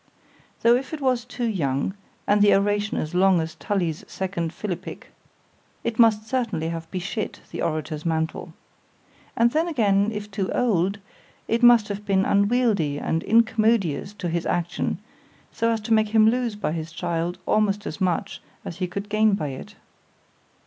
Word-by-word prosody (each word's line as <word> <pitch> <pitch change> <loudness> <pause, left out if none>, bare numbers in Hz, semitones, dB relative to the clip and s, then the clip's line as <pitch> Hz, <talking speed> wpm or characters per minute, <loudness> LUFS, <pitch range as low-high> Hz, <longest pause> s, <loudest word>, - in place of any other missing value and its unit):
—Tho' 235 +1 +6
if 270 +5 -3
it - - -9
was 255 -3 0
too 245 -1 -4
young, 150 - -1 0.3
and 205 0 +3
the 205 - +6
oration 205 +1 0
as 155 - -3
long 185 0 +4
as 160 0 -3
Tully's 170 -2 -2
second 180 -4 -3
Philippick—it 205 +4 -8
must 220 -2 +4
certainly 225 -10 -1
have 165 -1 -6
beshit 195 +4 -4
the - - -5
orator's 155 -1 -2
mantle.—And 165 +7 -4
then 320 +5 +1
again, 205 - +2
if 210 -1 -6
too 195 -1 -2
old,—it 205 +2 -2
must 240 -3 +6
have 205 0 -4
been 195 -1 +2
unwieldly 200 - +2
and 160 +2 -1
incommodious 220 -6 +2
to 185 - -4
his 170 0 -2
action—so 175 +5 -3
as 225 -1 +1
to 225 +2 0
make 220 -1 +4
him 220 0 +5
lose 240 -1 +1
by 205 - -2
his 160 0 -4
child 170 +1 -2
almost 210 -1 +1
as 155 - -6
much 180 -2 -1 0.2
as 170 - -6
he 185 -1 -1
could 200 +3 -5
gain 215 0 +3
by 150 -7 -3
it. 130 - -9
200 Hz, 155 wpm, -24 LUFS, 170-225 Hz, 0.3 s, Tho